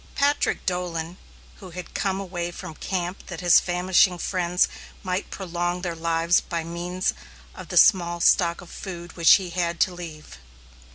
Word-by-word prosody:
Patrick 285 +1 +1
Dolan, 175 -1 -3 0.4
who 190 - -11
had 180 0 -9
come 195 -1 -1
away 175 -3 -4
from 165 -2 -8
camp 180 +2 -4
that 175 -3 -7
his 175 -2 +6
famishing 180 0 +2
friends 180 0 +1 0.4
might 185 0 -2
prolong 175 -1 -3
their 175 -2 -2
lives 165 +1 +2
by 170 -2 -4
means 175 +2 -2 0.4
of - - -10
the - - -3
small 175 -3 +5
stock 170 0 +3
of 175 - -13
food 175 -3 -8
which 170 -2 +7
he 185 -3 -3
had 170 -1 -1
to 185 - +3
leave! 155 - -10
175 Hz, 160 wpm, -24 LUFS, 170-185 Hz, 0.4 s, which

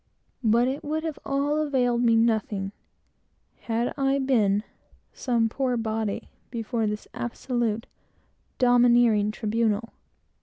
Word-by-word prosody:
But 235 +2 +4
it 270 +2 -3
would 310 +2 -2
have 320 -3 -4
all 285 +2 0
availed 250 -5 +1
me 230 -2 +4
nothing, 220 -4 +1 0.9
had 230 +1 -1
I 270 0 +2
been 215 -7 +2 0.5
"some 235 -3 +1
poor 250 +1 -1
body," 220 -2 -3 0.2
before 230 -1 -2
this 210 0 -4
absolute, 240 -2 -2 0.7
domineering 240 -4 +4
tribunal. 220 +1 -1
235 Hz, 110 wpm, -26 LUFS, 220-260 Hz, 0.9 s, But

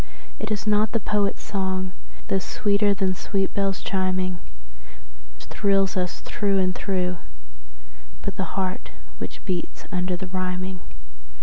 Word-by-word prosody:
And 215 - -2
it - - -5
is 210 -1 0
not 210 0 +4
the 230 - +3
poet's 205 -1 +1
song, 190 -2 0 0.4
though 195 - +3
sweeter 205 +2 +3
than 190 -1 +2
sweet 195 +1 0
bells 195 -1 +1
chiming, 185 -1 +1 1.0
Which 65 +2 -12
thrills 195 -2 +3
us 180 -2 -1
through 200 -2 +1
and 185 -1 +3
through, 180 -2 0 1.1
but - - -1
the - - -3
heart 185 -1 -1 0.3
which - - -6
beats 180 -3 -2
under 180 -1 +1
the 190 - -4
rhyming. 185 0 -2
190 Hz, 140 wpm, -26 LUFS, 185-200 Hz, 1.1 s, not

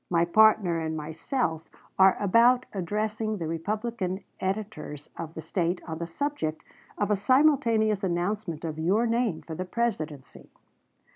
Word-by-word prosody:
My 170 -1 +3
partner 195 -2 +4
and 160 0 -3
myself 160 - -3 0.3
are 190 0 +6
about 235 +5 +4
addressing 215 +3 -2
the 170 - -4
Republican 195 +3 -3 0.2
editors 190 -7 -4
of 165 -1 -7
the 160 - -6
State 175 +2 -1
on 160 -1 -5
the 170 - -3
subject 165 - -3 0.3
of 205 0 0
a - - +4
simultaneous 230 -4 +3
announcement 175 -2 -2
of 160 -1 -4
your 195 +9 +2
name 230 -7 0
for 165 - -7
the 180 - -3
Presidency." 180 - -4
190 Hz, 140 wpm, -27 LUFS, 165-220 Hz, 0.3 s, are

